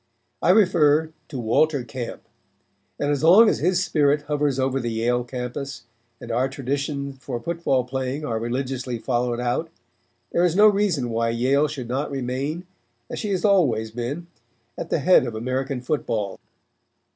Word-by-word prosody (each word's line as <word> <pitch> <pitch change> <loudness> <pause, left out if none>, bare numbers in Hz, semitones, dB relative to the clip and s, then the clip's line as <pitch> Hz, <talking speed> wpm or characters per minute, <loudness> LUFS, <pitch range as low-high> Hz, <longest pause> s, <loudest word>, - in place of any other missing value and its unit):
I - - +2
refer 160 -6 +4 0.2
to 140 - -7
Walter 135 +5 +2
Camp, 125 -1 -6 0.8
and 145 0 0
as 145 0 -1
long 195 +8 +8
as - - +2
his 180 +3 +2
spirit 145 -1 +2
hovers 145 -2 0
over 135 0 0
the 120 -2 -2
Yale 120 +2 0
campus 125 +2 -6 0.4
and 120 - -7
our 125 +3 +1
traditions 140 +1 -3
for 125 -2 -5
football 165 -3 0
playing 130 +3 -3
are 115 -4 -2
religiously 125 +1 -3
followed 120 0 -1
out 125 +7 -1 0.6
there 170 - +2
is 175 -2 +2
no 205 +2 +6
reason 195 - +2
why 115 0 0
Yale 130 +6 +2
should 140 -5 -6
not 135 +5 -2
remain, 140 +6 -3 0.5
as - - -4
she 200 -3 -1
always 145 - +3
has 110 - -21
been, 135 +8 -4 0.5
at 165 - -6
the - - +1
head 160 -4 +5
of 115 - -5
American 130 +3 -2
football." 115 -7 -2
135 Hz, 160 wpm, -23 LUFS, 120-155 Hz, 0.8 s, long